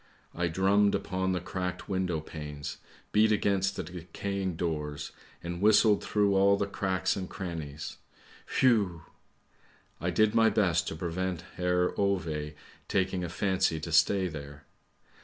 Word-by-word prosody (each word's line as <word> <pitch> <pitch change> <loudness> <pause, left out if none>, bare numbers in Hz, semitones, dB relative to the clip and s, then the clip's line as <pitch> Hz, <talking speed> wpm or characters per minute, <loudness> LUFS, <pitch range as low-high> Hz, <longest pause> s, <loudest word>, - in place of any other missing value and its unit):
I 90 0 0
drummed 100 +4 +3
upon 95 0 -1
the 90 - 0
cracked 90 0 -4
window 90 -4 -1
panes, 75 -2 -7 0.3
beat 110 +1 +4
against 100 -2 +1
the - - -3
decaying 90 +2 -4
doors, 75 -4 -3 0.3
and 85 +1 -5
whistled 105 0 +5
through 105 -1 +2
all 100 +1 +5
the 100 - 0
cracks 95 -2 -1
and 95 -2 -5
crannies, 80 -5 -6 0.6
whew! 105 -10 +3 1.0
I 90 - -1
did 105 +5 +3
my 115 -1 +5
best 90 -6 +2
to - - -3
prevent 90 +1 -3
Herr 90 0 +1
Ove 85 -7 -1 0.3
taking 95 -1 0
a 85 - -3
fancy 90 -3 +1
to 85 +2 -6
stay 95 +3 +4
there. 75 -3 -8
90 Hz, 140 wpm, -29 LUFS, 85-100 Hz, 1.0 s, whistled